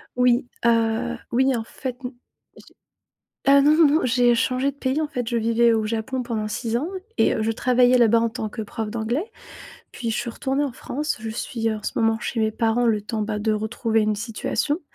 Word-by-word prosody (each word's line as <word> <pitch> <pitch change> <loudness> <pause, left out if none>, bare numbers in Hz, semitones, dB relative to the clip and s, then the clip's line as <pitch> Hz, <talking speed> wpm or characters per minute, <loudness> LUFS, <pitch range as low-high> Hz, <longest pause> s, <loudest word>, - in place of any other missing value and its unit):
Oui, 250 0 +3 0.2
heu, 230 +1 +1 0.2
oui, 260 +2 +2
en 225 - -2
fait, 250 +2 -6
n 250 - -4 0.4
j'ai - - -21 0.6
heu, 280 - +7
non 300 +2 +5
non 325 -2 +6
non, 300 +3 +3
j'ai 245 0 +3
changé 255 +3 +1
de 280 - -19
pays 275 +2 -1
en 305 - -1
fait, 245 -5 -4
je 240 - -1
vivais 230 +1 +3
au 220 -1 +1
Japon 230 +4 -2
pendant 220 -3 -3
6 230 +2 -2
ans 300 +8 -2 0.3
et - - +3
heu, 220 - -1
je 225 - 0
travaillais 250 +2 +3
là-bas 230 -1 +5
en 230 - +1
tant 225 -2 -4
que 220 +1 -6
prof 215 +1 -5
d'anglais. 235 - -2 0.7
Puis 230 -2 -4
je 220 - -1
suis 240 -1 -3
retournée 270 +4 -1
en 270 - -3
France, 295 +3 -4
je 225 - -5
suis, 225 0 -3
heu, 220 - -1
en 210 - -10
ce - - -2
moment 225 0 +2
chez 235 -1 -3
mes 220 0 +2
parents 230 +2 +1
le 215 -2 +2
temps 215 +1 -3
bah, 210 0 -2
de 215 +1 0
retrouver 220 +1 0
une 215 -1 +1
situation. 240 - -2
235 Hz, 225 wpm, -23 LUFS, 220-255 Hz, 0.7 s, heu